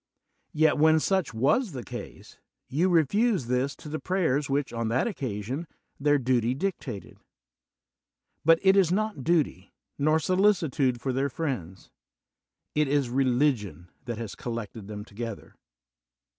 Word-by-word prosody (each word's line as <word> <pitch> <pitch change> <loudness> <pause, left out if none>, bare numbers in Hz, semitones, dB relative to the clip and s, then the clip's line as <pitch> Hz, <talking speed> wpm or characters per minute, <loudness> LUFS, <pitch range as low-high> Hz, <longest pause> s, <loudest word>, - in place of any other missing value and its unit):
Yet, 155 -1 +3
when 160 +1 +5
such 190 +2 0
was 150 - +1
the 125 -3 -5
case, - - -9 0.3
you 165 +8 +1
refused 180 - +2
this 125 +3 0
to - - -12
the 155 +1 -4
prayers 160 -7 0
which, 140 -1 -1
on 115 -1 -2
that 120 +4 +1
occasion, 130 - -4 0.3
their 145 +1 +3
duty 125 -2 +1
dic 190 +5 -2
tated. 110 -8 -8 1.3
But 165 +1 +6
it 190 0 +6
is 190 -4 +4
not 210 -7 -1
duty, 150 - 0 0.2
nor 155 +2 +3
solicitude 160 -8 +2
for 130 +1 -2
their 135 +2 0
friends; 125 - -5 0.8
it 150 -1 +2
is 140 -3 +1
religion 120 - 0 0.2
tiiat 120 -2 -3
has 115 -3 -5
collected 115 -5 -6
them 105 -1 -7
together. 115 0 -7
140 Hz, 140 wpm, -27 LUFS, 120-160 Hz, 1.3 s, But